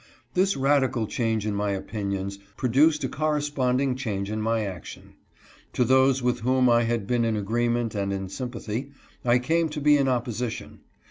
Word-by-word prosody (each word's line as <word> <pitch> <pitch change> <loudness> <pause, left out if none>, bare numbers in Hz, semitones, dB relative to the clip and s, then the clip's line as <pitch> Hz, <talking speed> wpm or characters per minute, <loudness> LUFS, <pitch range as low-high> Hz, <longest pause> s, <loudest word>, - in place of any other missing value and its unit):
This 190 0 +2
radical 135 -4 +2
change 110 -1 -1
in 105 - -1
my 100 0 -1
opinions 100 -1 -4 0.2
produced 145 +5 +3
a - - +1
corres 150 +1 -1
ponding 130 0 +1
change 105 -6 -3
in 110 0 -2
my 110 0 0
action. 95 -4 -9 0.6
To 125 - +2
those 130 +1 +4
with 125 0 +1
whom 130 +2 +2
1 120 -1 +4
had 115 -3 -1
been 120 +2 +1
in 115 -1 +1
agreement 120 +2 0
and 100 -2 -2
in 95 -1 -3
sympathy, 120 +3 -5 0.3
I 120 0 +4
came 160 +6 +1
to 150 0 -5
be 150 0 +5
in 140 -1 +1
opposition. 120 -2 -3
120 Hz, 175 wpm, -25 LUFS, 110-135 Hz, 0.6 s, be